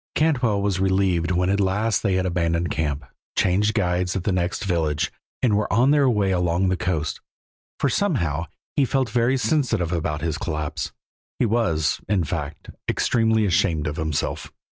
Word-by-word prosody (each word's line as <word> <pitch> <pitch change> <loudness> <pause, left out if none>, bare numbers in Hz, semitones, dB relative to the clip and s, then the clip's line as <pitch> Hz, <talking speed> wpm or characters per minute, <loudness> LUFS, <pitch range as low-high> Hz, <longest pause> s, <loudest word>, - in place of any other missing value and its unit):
Cantwell 125 -10 +2
was 100 -2 0
relieved 95 -3 +1
when 90 +1 +1
at 100 - +1
last 105 +3 +1
they 100 -3 +1
had 95 0 +1
abandoned 85 -1 0
camp, 75 -2 -2 0.3
changed 105 +4 +2
guides 90 -2 0
at 95 - -2
the 100 - 0
next 90 +2 -1
village, 80 -5 0 0.3
and 115 -5 +4
were 105 0 0
on 125 +6 +4
their 145 -3 +4
way 105 -5 +1
along 90 +1 +1
the 95 - +1
coast, 85 -5 -2 0.6
for - - +2
somehow 80 0 0 0.3
he 140 - +3
felt 130 -3 0
very 120 +3 +2
sensitive 115 - +1
about 80 -3 -2
his 80 -1 -2
collapse. 75 -3 -3 0.5
He - - +2
was, 105 -9 +1
in 100 -4 +2
fact, 75 -1 -5 0.2
extremely 110 -2 +2
ashamed 85 -4 +1
of 75 - -3
himself. 80 -2 -2
95 Hz, 165 wpm, -23 LUFS, 85-110 Hz, 0.6 s, and